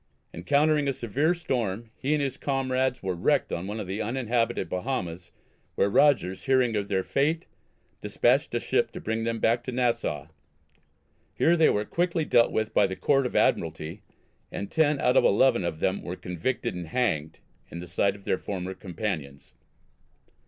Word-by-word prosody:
Encountering 145 - +2
a 135 - +1
severe 140 - 0
storm 115 - -3
he 145 +3 0
and 145 - 0
his 135 -2 -2
comrades 130 -3 -1
were 95 -1 -1
wrecked 85 - +1
on 85 +3 -3
one 105 +2 -4
of 105 - -4
the 95 +4 -4
uninhabited 120 0 -1
Bahamas, 90 -5 -4 0.5
where 100 - +2
Rogers, 105 -9 +3
hearing 130 -4 +3
of 100 -1 -1
their 95 -2 0
fate, 155 - 0 0.6
despatched - - +1
a - - +2
ship - - 0
to - - -6
bring 110 +1 -2
them 115 0 -1
back 115 +2 +1
to 130 - -3
Nassau. 120 - -1 1.1
Here 170 - +4
they 160 -2 +5
were 105 +1 0
quickly 170 - 0
dealt 115 - +4
with 110 0 -1
by 100 - +4
the 95 - -5
Court 135 +2 +2
of - - -9
Admiralty, 80 +7 0 0.5
and 100 - -5
ten 150 -3 +2
out 125 - +3
of - - +6
eleven 120 0 +4
of 80 -2 -3
them 95 +3 0
were 90 - -5
convicted 90 +9 -3
and 90 -2 -6
hanged 80 -9 -1 0.3
"in 85 - -7
the 90 - -8
sight 100 +3 +1
of 100 -1 -15
their - - 0
former 95 -1 -4
companions." 85 -7 -5
115 Hz, 175 wpm, -27 LUFS, 95-135 Hz, 1.1 s, of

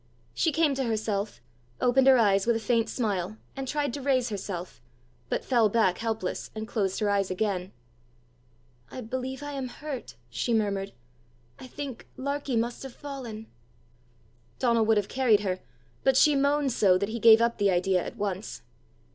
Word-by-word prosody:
She 325 - +1
came 310 -1 +2
to 270 0 -1
herself, 215 - -2 0.4
opened 255 +2 +3
her 265 -1 +8
eyes 200 -3 +3
with 235 - +4
a - - 0
faint 230 +1 +1
smile, 210 -4 -2 0.2
and 270 -1 -5
tried 290 -2 -1
to 285 - -4
raise 260 -3 +1
herself, 190 - -6 0.5
but - - -2
fell 235 -5 +3
back 200 -4 +2
helpless, 220 -5 -3
and 220 0 -5
closed 195 -5 -1
her 210 - +2
eyes 200 -1 +1
again. 185 -1 -2 1.2
"I 255 - -7
believe 260 +4 -4
I 290 - -5
am 270 -2 -4
hurt!" 275 0 -7 0.2
she 230 - 0
murmured. 200 -2 -1 0.7
"I - - -9
think 270 -2 -7
Larkie 280 -1 -2
must 235 +1 -1
have 265 -3 -8
fallen!" 250 -7 -7 1.1
Donal 235 -3 +2
would 220 0 +3
have 205 -1 0
carried 240 -5 +3
her, 185 -2 -2 0.4
but 265 -1 +4
she 300 +1 +6
moaned 280 0 +2
so, 195 -5 +4
that 200 +2 -2
he 235 +1 -4
gave 225 0 +8
up 235 0 +1
the 200 -1 +3
idea 180 0 +2
at - - -7
once. 200 0 -4
225 Hz, 170 wpm, -27 LUFS, 200-265 Hz, 1.2 s, her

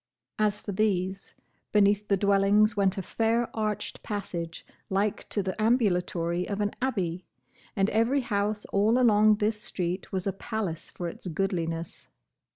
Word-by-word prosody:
As 210 -1 +2
for - - -5
these, 190 -2 -1 0.4
beneath 205 0 +3
the 200 - +3
dwellings 200 +2 +4
went 195 -2 +2
a 195 - -2
fair 230 +4 0
arched 215 -2 -2
passage 175 -5 -5 0.2
like 200 +2 -1
to 205 - -1
the 190 0 -2
ambulatory 180 -6 +1
of 200 0 -2
an 205 0 0
abbey; 185 -9 -1 0.5
and 195 -2 +2
every 235 +6 +2
house 210 -2 -1
all 210 +4 +4
along 215 -3 +5
this 210 0 -1
street 180 -1 -3
was 185 -2 -2
a 195 - 0
palace 195 -5 -4
for 175 - -5
its 170 - -8
goodliness. 165 -2 -3
200 Hz, 150 wpm, -28 LUFS, 185-215 Hz, 0.5 s, along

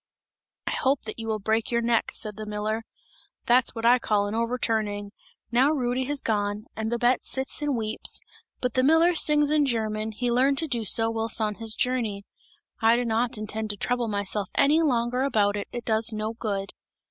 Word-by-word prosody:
'I - - -2
hope 265 +1 +1
that 215 +1 -7
you 225 - -5
will 220 -1 0
break 220 +2 -1
your 235 -1 +1
neck!' 230 -1 +1
said 210 -1 -2
the 215 +1 -7
miller. 210 +1 -2 0.6
That's 245 +1 +3
what 225 0 -4
I 245 +2 +6
call 210 -3 +1
an 205 - -4
overturning! 220 -3 -1 0.4
Now 255 +4 +4
Rudy 255 -2 -1
has 285 +1 -2
gone, 205 -1 -1
and 220 0 -3
Babette 240 +1 +1
sits 265 +2 -1
and 290 -2 0
weeps; 220 -1 0 0.4
but 250 - -1
the 255 - +2
miller 325 +6 +4
sings 300 -2 +3
in 300 -2 +3
German, 220 -2 -2
he 240 +3 -2
learned 265 +3 +3
to 320 - 0
do 235 -6 -2
so 225 +2 +3
whilst 225 0 -1
on 215 -1 0
his 220 -1 +2
journey! 230 -6 -1 0.6
I 225 +1 +5
do 245 +1 0
not 230 +1 0
intend 215 +1 -4
to 205 - -1
trouble 245 +2 -1
myself 200 -1 -2
any 300 +4 +4
longer 250 -4 +1
about 210 -7 +2
it, 205 - -4
it 240 -1 -6
does 220 +1 +2
no 215 +1 -3
good!" 200 -4 -4
230 Hz, 195 wpm, -26 LUFS, 215-250 Hz, 0.6 s, I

